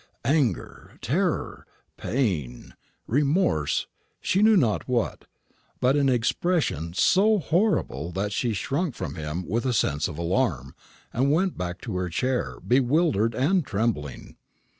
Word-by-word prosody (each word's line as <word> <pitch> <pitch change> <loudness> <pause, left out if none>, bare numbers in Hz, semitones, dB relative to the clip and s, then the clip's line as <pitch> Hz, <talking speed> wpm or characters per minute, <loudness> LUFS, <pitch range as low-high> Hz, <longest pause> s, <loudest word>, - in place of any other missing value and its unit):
Anger, 135 - -1
terror, - - -1 0.3
pain, 85 - -2 0.3
remorse, 140 - +1 0.3
she 195 - +1
knew 215 0 +6
not 115 - +1
what, 120 -3 -1 0.5
but 130 +2 +3
an 140 -2 +3
expression 120 - 0
so 210 - +4
horrible 165 - 0
that 100 +2 -2
she 115 +4 0
shrunk 140 - -2
from 70 - -5
him 80 +2 -5
with 115 +5 -1
a 130 -2 0
sense 75 -8 +1
of 75 - -7
alarm, 85 - -1 0.4
and 135 +4 +2
went 180 +4 +1
back 90 0 -4
to 90 - -4
her 90 -1 -2
chair, 125 +9 -1
bewildered 125 - +2
and 165 +9 +2
trembling. 100 - -3
120 Hz, 130 wpm, -25 LUFS, 90-150 Hz, 0.5 s, knew